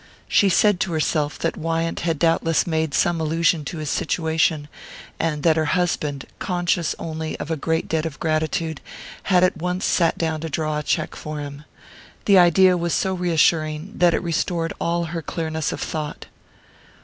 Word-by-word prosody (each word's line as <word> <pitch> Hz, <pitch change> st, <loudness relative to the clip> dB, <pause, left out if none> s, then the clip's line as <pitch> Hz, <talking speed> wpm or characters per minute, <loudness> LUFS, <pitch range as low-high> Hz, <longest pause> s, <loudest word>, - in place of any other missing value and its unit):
She 200 Hz, -3 st, +4 dB
said 205 Hz, +1 st, +3 dB
to 175 Hz, -, -1 dB
herself 155 Hz, -1 st, 0 dB
that -, -, -1 dB
Wyant 165 Hz, +1 st, -2 dB
had 165 Hz, -2 st, -1 dB
doubtless 165 Hz, 0 st, +2 dB
made 160 Hz, -3 st, -1 dB
some 170 Hz, -2 st, +2 dB
allusion 165 Hz, +1 st, +1 dB
to 165 Hz, -, -5 dB
his 155 Hz, -2 st, -3 dB
situation, 160 Hz, -2 st, 0 dB, 0.5 s
and 150 Hz, -3 st, -1 dB
that 165 Hz, -1 st, +4 dB
her 155 Hz, -, +2 dB
husband, 150 Hz, -6 st, -1 dB
conscious 175 Hz, -2 st, 0 dB
only 160 Hz, -1 st, -5 dB
of 150 Hz, -, -5 dB
a -, -, +1 dB
great 160 Hz, +2 st, -1 dB
debt 160 Hz, 0 st, 0 dB
of 150 Hz, -2 st, -9 dB
gratitude, 160 Hz, 0 st, -1 dB, 0.5 s
had 180 Hz, -2 st, +5 dB
at 185 Hz, -, +2 dB
once 180 Hz, +2 st, -2 dB
sat 170 Hz, -2 st, +2 dB
down 160 Hz, -2 st, -1 dB
to 165 Hz, -, -4 dB
draw 155 Hz, 0 st, -1 dB
a -, -, -5 dB
cheque 155 Hz, +1 st, -1 dB
for 150 Hz, 0 st, -6 dB
him. 145 Hz, 0 st, -8 dB, 0.6 s
The 200 Hz, -2 st, +6 dB
idea 180 Hz, +1 st, +5 dB
was 170 Hz, -1 st, -1 dB
so 190 Hz, -, 0 dB
reassuring 165 Hz, -1 st, +1 dB
that 175 Hz, -2 st, +4 dB
it -, -, -2 dB
restored 165 Hz, 0 st, -1 dB
all 170 Hz, 0 st, 0 dB
her 165 Hz, -, -2 dB
clearness 160 Hz, -1 st, -3 dB
of -, -, -5 dB
thought. 150 Hz, -1 st, -4 dB
165 Hz, 175 wpm, -22 LUFS, 155-175 Hz, 0.6 s, The